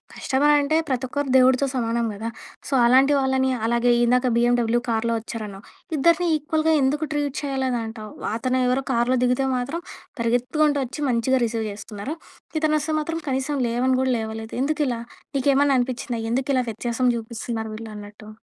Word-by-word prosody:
Customer 290 +2 +2
అంటే 290 +2 +1
ప్రతి 260 -1 -1
ఒక్కరు 285 +2 -2
దేవుడితో 260 +1 +5
సమానం 235 -1 0
కదా! 220 +3 -5 0.4
సో, - - -9
అలాంటి 265 +4 +5
వాళ్ళని, 265 -1 +1 0.2
అలాగే 235 +1 +2
ఇందాక 250 +2 +3
బిఏండబ్లు 240 -1 +2
కార్‌లో 230 0 0
వచ్చారన్నావు. 215 -3 -7 0.3
ఇద్దరిని 335 +4 +3
ఈక్వల్‌గా 310 +1 0
ఎందుకు 295 +4 +1
ట్రీట్ 290 -2 -1
చేయాలేదు 265 -3 -1
అంటావు? 220 -1 -8 0.3
అతను 255 +2 0
ఎవరో 255 +2 +1
కార్‌లో 240 +2 +2
దిగితే 250 +2 +2
మాత్రం 280 +8 -3 0.4
పరిగెత్తుకుంటూ, 255 +6 +1
వచ్చి 285 +5 -7
మంచిగా 250 +2 +2
రిసీవ్ 225 -1 -2
చేస్తున్నారు. 210 +6 -6 0.5
ఇతను 305 -1 +2
వస్తే 305 +1 -2
మాత్రం, 330 +2 -3
కనీసం 270 +2 -1
లేవని 255 +2 +1
కూడా 260 -1 +1
లేవలేదు 220 0 -5
ఎందుకిలా? 285 -5 0 0.4
నీకేమన్నా 275 +1 +3
అనిపించిందా, 245 -1 -3
ఎందుకు 265 +3 -1
ఇలా 255 -1 +2
వ్యత్యాసం 240 +3 -1
చూపిస్తున్నారు 225 -1 -5
వీళ్ళు 225 0 -8
అన్నట్టు? 210 +1 -11
255 Hz, 155 wpm, -23 LUFS, 230-280 Hz, 0.5 s, దేవుడితో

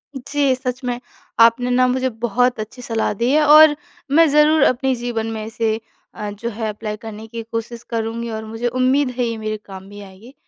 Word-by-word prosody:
जी। 275 +1 0
सच 255 0 -4
में। 245 -1 -2 0.4
आपने 230 +2 +5
ना 255 +1 +4
मुझे 260 +1 0 0.2
बहुत 245 +2 +1
अच्छी 220 +4 -7
सलाह 225 -2 -1
दी 240 +2 +2
है 305 +2 +4
और 305 0 +8 0.4
मैं 325 +3 +6
ज़रूर 300 +2 +4
अपने 265 +1 +2
जीवन 235 -2 -3
में 220 -1 -5
इसे 220 0 -1 0.3
अ, 210 -2 -5
जो 215 +3 -5
है 220 -1 -4
अप्लाई 210 0 -5
करने 220 -1 -9
की 230 +1 -6
कोशिश 230 +1 -5
करुँगी 230 0 -3
और 220 0 -5
मुझे 225 +2 -3
उम्मीद 255 +3 +2
है 250 - +1
ये 230 -1 -3
मेरे 215 0 -3
काम 190 0 -11
भी 205 0 -10
आएगी। 200 +6 -14
235 Hz, 200 wpm, -20 LUFS, 220-255 Hz, 0.4 s, और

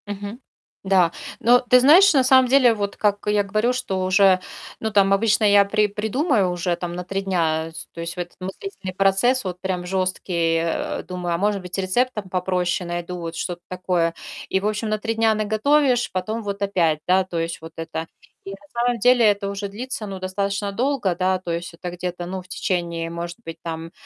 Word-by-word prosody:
Мгм. 205 +3 -6 0.4
Да. 190 -3 +3 0.3
Но 245 +2 +5
ты 250 +1 +4
знаешь, 340 +10 +7
на 265 - +5
самом 260 0 +5
деле, 255 -3 +5
вот, 205 -2 -4
как 205 -1 +1
я 210 0 +3
говорю, 215 +5 +1
что 190 -7 -2
уже 185 0 +4 0.4
ну 220 - -2
там 195 -1 +4
обычно 215 +2 +2
я 205 -1 +6
при 210 +1 +1
придумаю 215 - 0
уже 175 0 -1
там 175 0 -5
на 180 - -4
3 195 +2 -3
дня, 165 -4 0
с 160 - -9
то 165 - -7
есть 170 +1 -5
вот 175 - -1
этот - - -30
мыслительный 190 - -6
процесс 195 +7 +2
вот 180 -2 -5
прям 185 -2 -2
жёсткий, 180 -2 0
э. 165 0 -2
Думаю, 180 -2 -3
а - - -1
может 200 +1 0
быть 180 +1 -6
рецептом 210 +2 -1
попроще 180 -1 -1
найду, 175 +1 -4
вот 165 -1 -6
что-то 175 0 -4
такое. 180 -2 -1 0.3
И, 190 - +1
в 200 - -1
общем, 215 +1 -2
на 215 - 0
3 225 +2 -2
дня 225 -1 +2
наготовишь, 245 +4 +2
потом 215 +5 -3
вот 200 -1 -5
опять, 170 -6 +1
да, 185 +1 +4
то 175 -2 -5
есть 165 -1 -3
вот 160 0 -10
это. 165 0 -5 0.4
И - - -8
на 195 - -6 0.2
самом 240 0 +1
деле 245 +2 +4
это 205 -2 +2
уже 200 0 -4
длится 220 +2 -5
ну 195 -1 -6
достаточно 200 +2 -2
долго, 235 -4 0
да, 185 +1 +1
то 180 -2 -5
есть 170 0 -4
это 175 +1 -6
где-то, 180 0 -5
ну 185 +1 -5
в 180 - -18
течение, 170 -3 -2
может 170 +1 -5
быть, 165 - -7
там, 165 0 -6
195 Hz, 205 wpm, -22 LUFS, 175-215 Hz, 0.4 s, знаешь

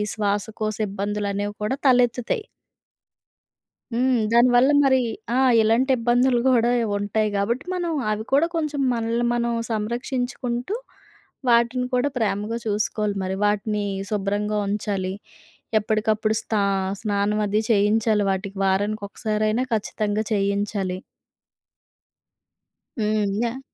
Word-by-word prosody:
శ్వాసకోశ 215 +1 -2
ఇబ్బందులనేవి 205 0 -2
కూడా 260 +6 -1
తలెత్తుతాయి. 250 - +2 1.5
హ్మ్. 250 +1 +2
దానివల్ల 245 +3 +5
మరి 260 -1 +4 0.4
ఆ! - - +2 0.2
ఇలాంటి 230 +5 +2
ఇబ్బందులు 245 +1 +2
కూడా 240 -2 +4 0.3
ఉంటాయి 210 +1 0
గాబట్టి, 230 - -1
మనం 350 -2 -2 0.2
అవి 215 +1 -2
కూడా 300 +4 +4
కొంచెం 300 -3 -1
మనల్ని 230 +1 -1
మనం 235 0 0 0.2
సంరక్షించుకుంటూ, 245 - -2 0.7
వాటిని 235 +2 +3
కూడా 265 +3 +2
ప్రేమగా 215 0 -1
చూసుకోవాలి 210 0 -1
మరి. 185 +1 -2
వాటిని 210 0 0 0.3
శుభ్రంగా 210 +1 -1
ఉంచాలి, 200 -2 -2 0.7
ఎప్పటికప్పుడు 215 +1 0
స్త - - -7 0.5
స్నానం 210 0 0
అది 210 +2 +1
చేయించాలి 210 0 +2
వాటికి. 195 +1 -4
వారానికి 205 +2 0
ఒకసారైనా 215 +4 -1
ఖచ్చితంగా 215 0 -1
చేయించాలి. 200 -2 -1 2.0
హ్మ్.యహ్! 215 +3 0
215 Hz, 100 wpm, -23 LUFS, 205-240 Hz, 2.0 s, దానివల్ల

